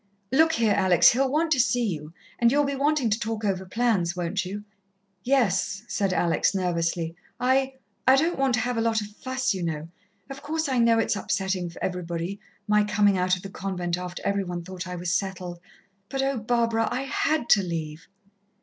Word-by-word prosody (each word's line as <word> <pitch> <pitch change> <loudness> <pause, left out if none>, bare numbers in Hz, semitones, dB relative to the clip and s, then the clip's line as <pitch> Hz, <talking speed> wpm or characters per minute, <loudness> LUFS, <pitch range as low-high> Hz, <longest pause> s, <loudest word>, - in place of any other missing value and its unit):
Look 320 +4 +4
here, 225 -7 +2
Alex, 180 -3 +5
he'll 265 +2 +1
want 315 +2 +1
to 275 - +3
see 245 -1 +2
you 155 -6 -4 0.3
and 235 0 +4
you'll 290 +2 +3
be 280 0 -1
wanting 275 -3 +1
to 215 - +1
talk 220 -1 -3
over 190 -2 -1
plans, 195 -6 +1
won't 180 +3 -1
you?" 200 +3 -6 0.6
"Yes," 215 -6 +1
said 195 -4 0
Alex 175 +2 +1
nervously. 170 -2 -1 0.2
"I 265 +1 +2 0.3
I 260 - +8
don't 320 +3 +1
want 270 -2 +3
to 240 - 0
have 245 +1 -2
a - - +1
lot 225 -1 +1
of 210 - -5
fuss, 260 -1 -1
you 190 - -4
know. 160 -1 -3 0.4
Of 275 0 -8
course 315 +1 -2
I 260 -3 +1
know 230 -1 +4
it's 225 - +1
upsetting 190 -2 -1
for 170 - -10
everybody 180 +1 -3 0.3
my 210 0 +4
coming 205 -1 +3
out 180 0 +2
of 180 - -10
the 195 - -6
convent 180 -3 -3
after 180 0 -6
every 200 0 +1
one 175 -2 -5
thought 185 +1 -7
I 180 - -5
was 175 0 -2
settled. 180 -2 -3 0.5
But, 270 0 -1
oh, 270 -1 0
Barbara! 230 0 +1
I 260 - -1
had 290 0 0
to 200 - +6
leave!" 165 -3 -5
205 Hz, 200 wpm, -26 LUFS, 180-255 Hz, 0.6 s, I